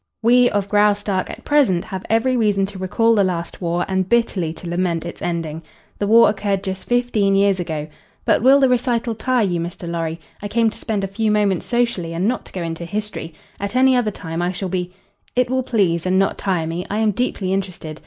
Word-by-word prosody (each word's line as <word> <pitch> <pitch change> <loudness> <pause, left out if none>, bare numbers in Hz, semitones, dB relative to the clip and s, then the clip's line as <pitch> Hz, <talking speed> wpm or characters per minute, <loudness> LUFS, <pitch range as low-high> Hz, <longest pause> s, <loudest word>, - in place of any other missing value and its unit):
"We, 245 +1 +5
of 200 -1 -1
Graustark, 205 -2 +1
at - - -9
present 260 -13 +3
have 190 -1 -6
every 230 +3 +2
reason 205 -4 +2
to 195 -1 -9
recall 225 +5 +2
the 205 -3 +3
last 175 -2 -3
war 175 0 0
and 190 -1 -1
bitterly 205 -8 +1
to 175 - -10
lament 170 -1 -1
its 170 - -7
ending. 165 -2 -3 0.4
The 205 - 0
war 230 +2 +7
occurred 200 -1 -1
just 190 -1 -5
fifteen 240 -5 +2
years 195 -1 +3
ago 155 -3 -3 0.4
but - - +3
will 265 +4 +6
the 270 - +5
recital 240 -2 +1
tire 235 +1 +1
you, 175 -3 -1
Mr. 170 +1 -5
Lorry? 165 -1 -3 0.2
I 205 - -3
came 225 +1 +2
to - - -12
spend 215 -4 -2
a - - 0
few 215 +3 -1
moments 205 -4 +1
socially 235 -9 0
and 180 +4 0
not 250 +2 -1
to - - -13
go 180 - -4
into 165 0 -4
history. 170 -3 -5 0.2
At 200 +3 -4
any 260 0 +5
other 245 -3 +2
time 165 -4 -5
I 175 +1 0
shall 185 0 -4
be 180 -1 -2 0.2
" 205 - -37
"It 250 0 +1
will 260 0 +1
please 185 -9 0
and 185 +1 +2
not 195 0 +2
tire 180 -5 0
me. 165 +2 -3
I 205 - -2
am 220 -1 +2
deeply 195 -4 -1
interested. 180 -5 -4
195 Hz, 225 wpm, -20 LUFS, 175-225 Hz, 0.4 s, war